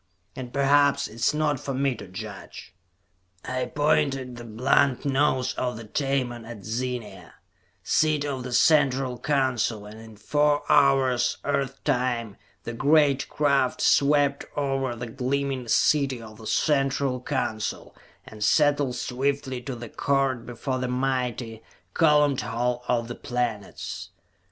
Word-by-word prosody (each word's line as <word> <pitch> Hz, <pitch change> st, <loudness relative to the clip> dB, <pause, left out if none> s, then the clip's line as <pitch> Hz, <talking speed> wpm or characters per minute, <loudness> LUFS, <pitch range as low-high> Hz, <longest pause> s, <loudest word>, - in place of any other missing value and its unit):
And 130 Hz, -2 st, -7 dB
perhaps 140 Hz, +1 st, +3 dB
it -, -, -14 dB
is 115 Hz, +1 st, +1 dB
not 150 Hz, -2 st, 0 dB
for 135 Hz, -, -4 dB
me 135 Hz, 0 st, +1 dB
to 105 Hz, -, -10 dB
judge. 100 Hz, +2 st, -9 dB, 0.7 s
I 130 Hz, 0 st, -2 dB
pointed 140 Hz, -2 st, 0 dB
the 120 Hz, -, -9 dB
blunt 125 Hz, +4 st, +1 dB
nose 135 Hz, -2 st, +1 dB
of 125 Hz, -2 st, -3 dB
the 115 Hz, -, -8 dB
Tamon 125 Hz, 0 st, -2 dB
at 110 Hz, -3 st, -10 dB
Zenia, 120 Hz, 0 st, -5 dB, 0.5 s
seat 155 Hz, -2 st, +2 dB
of 135 Hz, -3 st, -3 dB
the 125 Hz, 0 st, -6 dB
Central 135 Hz, -2 st, +3 dB
Council, 130 Hz, -7 st, 0 dB
and 105 Hz, +1 st, -11 dB
in 110 Hz, -1 st, -13 dB
four 145 Hz, +6 st, +1 dB
hours, 135 Hz, -3 st, +3 dB
Earth 135 Hz, -1 st, -2 dB
time, 120 Hz, -4 st, -1 dB, 0.3 s
the 120 Hz, -, -5 dB
great 140 Hz, +1 st, +3 dB
craft 140 Hz, -3 st, +1 dB
swept 140 Hz, 0 st, +3 dB
over 135 Hz, -3 st, -1 dB
the 120 Hz, +1 st, -6 dB
gleaming 130 Hz, +1 st, -2 dB
city 135 Hz, +2 st, +2 dB
of 110 Hz, -1 st, -12 dB
the 110 Hz, -, -9 dB
Central 135 Hz, -3 st, +1 dB
Council 125 Hz, -6 st, -3 dB, 0.3 s
and 105 Hz, -1 st, -7 dB
settled 145 Hz, 0 st, +3 dB
swiftly 130 Hz, 0 st, -2 dB
to 130 Hz, +1 st, -5 dB
the 120 Hz, 0 st, -8 dB
court 135 Hz, -3 st, 0 dB
before 130 Hz, +2 st, -3 dB
the 125 Hz, -, -2 dB
mighty, 125 Hz, -3 st, -2 dB, 0.3 s
columned 150 Hz, -4 st, +3 dB
Hall 125 Hz, +1 st, -2 dB
of 120 Hz, -2 st, 0 dB
the 120 Hz, -, -5 dB
Planets. 120 Hz, -5 st, -4 dB
130 Hz, 135 wpm, -25 LUFS, 120-140 Hz, 0.7 s, perhaps